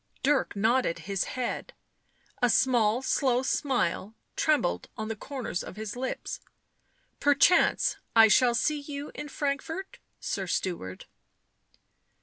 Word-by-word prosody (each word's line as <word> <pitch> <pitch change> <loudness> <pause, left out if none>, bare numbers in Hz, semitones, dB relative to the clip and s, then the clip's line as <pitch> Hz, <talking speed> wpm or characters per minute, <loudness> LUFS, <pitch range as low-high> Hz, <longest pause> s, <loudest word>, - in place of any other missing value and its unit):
Dirk 280 -4 +2
nodded 220 -2 +2
his 195 -1 -1
head; 250 - -3 0.7
a 245 - +4
small, 235 0 +3
slow 255 -2 +1
smile 240 - -1 0.2
trembled 285 - +1
on 220 0 -4
the 225 - -2
corners 250 -5 -5
of - - -9
his 215 0 -5
lips. 255 +1 -4 0.4
" - - -42
Perchance 290 +5 +4 0.2
I 225 -1 +9
shall 240 +2 +4
see 300 +5 +1
you 285 0 -7
in 295 - -7
Frankfort, 295 +7 -3 0.2
sir 195 -2 -3
steward." 170 - -3
250 Hz, 125 wpm, -28 LUFS, 210-280 Hz, 0.7 s, I